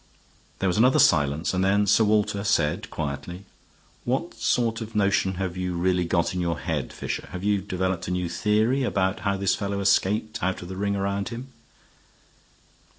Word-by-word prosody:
There 95 Hz, -, 0 dB
was 90 Hz, +3 st, +1 dB
another 130 Hz, +3 st, +5 dB
silence, 75 Hz, 0 st, +3 dB
and 95 Hz, 0 st, +1 dB
then 100 Hz, +2 st, +3 dB
Sir 105 Hz, +3 st, +4 dB
Walter 105 Hz, -1 st, +1 dB
said, 75 Hz, -7 st, +1 dB
quietly: 75 Hz, +6 st, -5 dB, 0.6 s
"What -, -, -2 dB
sort 115 Hz, -1 st, 0 dB
of 110 Hz, 0 st, -7 dB
notion 100 Hz, -2 st, +2 dB
have 90 Hz, -1 st, -3 dB
you 90 Hz, -1 st, -3 dB
really 90 Hz, 0 st, +1 dB
got 85 Hz, 0 st, 0 dB
in 90 Hz, -, -2 dB
your 85 Hz, -2 st, -1 dB
head, -, -, -3 dB
Fisher? -, -, -5 dB
Have 90 Hz, +1 st, -5 dB
you 100 Hz, -1 st, +1 dB
developed 95 Hz, -1 st, -2 dB
a -, -, -3 dB
new 90 Hz, -1 st, -1 dB
theory 110 Hz, +9 st, +1 dB
about 95 Hz, -6 st, 0 dB
how 100 Hz, -1 st, -1 dB
this 95 Hz, -1 st, +1 dB
fellow 100 Hz, -1 st, -2 dB
escaped 105 Hz, +3 st, +1 dB
out 95 Hz, 0 st, -1 dB
of 90 Hz, -, -9 dB
the 95 Hz, -, -6 dB
ring 100 Hz, +1 st, -1 dB
round 100 Hz, 0 st, -2 dB
him?" 120 Hz, +3 st, -7 dB
95 Hz, 180 wpm, -25 LUFS, 90-105 Hz, 0.6 s, another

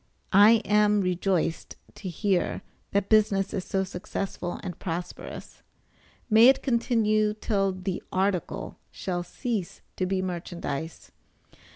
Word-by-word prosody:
I 215 Hz, +3 st, +7 dB
am 210 Hz, 0 st, +4 dB
rejoiced 180 Hz, -2 st, -1 dB, 0.2 s
to 190 Hz, -, -7 dB
hear 185 Hz, +1 st, 0 dB, 0.3 s
that 200 Hz, 0 st, 0 dB
business 205 Hz, -3 st, +3 dB
is 190 Hz, -, -2 dB
so 195 Hz, -1 st, 0 dB
successful 180 Hz, -1 st, -5 dB
and 180 Hz, -, -6 dB
prosperous 175 Hz, -1 st, -6 dB, 0.7 s
may 225 Hz, 0 st, +7 dB
it 265 Hz, -, +5 dB
continue 215 Hz, -4 st, +2 dB
till 200 Hz, -2 st, 0 dB
the 185 Hz, 0 st, -4 dB
article 190 Hz, -1 st, -1 dB
shall 180 Hz, -2 st, -3 dB
cease 210 Hz, -1 st, -4 dB, 0.2 s
to 185 Hz, -, 0 dB
be 190 Hz, 0 st, 0 dB
merchandize. 170 Hz, -4 st, -5 dB
195 Hz, 115 wpm, -27 LUFS, 180-210 Hz, 0.7 s, I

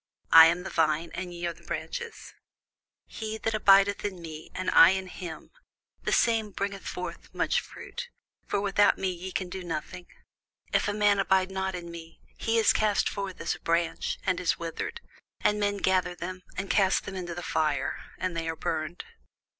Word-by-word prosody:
I 165 Hz, 0 st, +11 dB
am 175 Hz, +2 st, 0 dB
the 190 Hz, -, -6 dB
vine, 160 Hz, 0 st, +1 dB
ye 175 Hz, -2 st, -5 dB
are 170 Hz, -, -1 dB
the -, -, -20 dB
branches: 475 Hz, -2 st, -6 dB, 0.7 s
He 220 Hz, -1 st, -5 dB
that 225 Hz, 0 st, -2 dB
abideth 200 Hz, -1 st, +5 dB
in 195 Hz, -3 st, -3 dB
me, 160 Hz, -2 st, -9 dB
and 185 Hz, -, -1 dB
I 165 Hz, -, +9 dB
in 190 Hz, 0 st, 0 dB
him, 175 Hz, -3 st, -8 dB, 0.5 s
the -, -, -2 dB
same 225 Hz, -2 st, +3 dB
bringeth 200 Hz, 0 st, -4 dB
forth 180 Hz, -, -6 dB
much -, -, +2 dB
fruit: 485 Hz, 0 st, -8 dB, 0.4 s
for -, -, 0 dB
without 205 Hz, 0 st, +3 dB
me 190 Hz, -1 st, 0 dB
ye 180 Hz, +1 st, -6 dB
can 185 Hz, 0 st, -2 dB
do 185 Hz, +1 st, -6 dB
nothing. 175 Hz, +1 st, -5 dB, 0.7 s
If -, -, +3 dB
a 205 Hz, -, 0 dB
man 205 Hz, -1 st, +3 dB
abide 190 Hz, -1 st, +2 dB
not 190 Hz, 0 st, -2 dB
in 170 Hz, -1 st, -7 dB
me, 165 Hz, -1 st, -10 dB, 0.2 s
he 225 Hz, 0 st, +1 dB
is 225 Hz, -, +5 dB
cast 210 Hz, -2 st, +2 dB
forth 195 Hz, -2 st, -4 dB
as 165 Hz, -, -1 dB
a -, -, -9 dB
branch, 170 Hz, 0 st, 0 dB
and 185 Hz, -2 st, +1 dB
is 180 Hz, -, +1 dB
withered; 170 Hz, -, -5 dB, 0.4 s
and 210 Hz, 0 st, +2 dB
men 205 Hz, 0 st, +1 dB
gather 185 Hz, -2 st, +1 dB
them, 185 Hz, +2 st, -6 dB, 0.2 s
and 190 Hz, +1 st, -2 dB
cast 190 Hz, -2 st, +3 dB
them 195 Hz, -, -6 dB
into 175 Hz, -2 st, -5 dB
the 175 Hz, -, -6 dB
fire, 155 Hz, -3 st, 0 dB, 0.2 s
and 185 Hz, -2 st, -2 dB
they 165 Hz, 0 st, -2 dB
are 160 Hz, -, -2 dB
burned. 160 Hz, +1 st, -3 dB
185 Hz, 185 wpm, -28 LUFS, 170-200 Hz, 0.7 s, I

